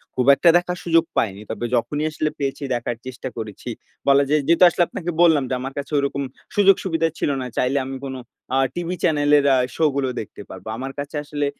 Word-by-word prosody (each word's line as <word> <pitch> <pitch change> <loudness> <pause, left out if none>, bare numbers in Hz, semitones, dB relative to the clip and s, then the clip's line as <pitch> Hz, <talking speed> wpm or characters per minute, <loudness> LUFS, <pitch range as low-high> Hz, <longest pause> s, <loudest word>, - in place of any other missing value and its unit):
খুব 125 - +1
একটা 170 - +4
দেখার 180 0 -2
সুযোগ 165 -1 +4
পাইনি। 100 -2 0
তবে 115 +2 -3
যখনই 145 +6 -1
আসলে 155 0 -1
পেয়েছি 140 +1 -3
দেখার 120 0 -3
চেষ্টা 130 0 -6
করেছি। 110 -3 -6 0.4
বলা 140 0 +6
যায় 150 0 +3
যেহেতু 170 +2 +5
আসলে 175 - +2
আপনাকে 175 -2 -4
বললাম 160 -5 +5
যে - - -1
আমার 135 +1 -5
কাছে 140 - -5
ওরকম 140 0 -1 0.3
সুযোগ-সুবিধা 190 -5 +3
ছিল - - 0
না। 125 - -4
চাইলে 130 +2 +1
আমি 135 0 -5
কোন 135 -1 -5 0.4
আ - - +3 0.2
টিভি 175 +1 -3
চ্যানেলের 145 -3 +3
অ্যা 135 - +5 0.2
শো 160 - +2
গুলো 135 -2 0
দেখতে 105 - -10
পারবো। - - -10
আমার 135 +2 -5
কাছে 145 +2 -5
আসলে 145 0 -2
145 Hz, 200 wpm, -22 LUFS, 130-165 Hz, 0.4 s, বলা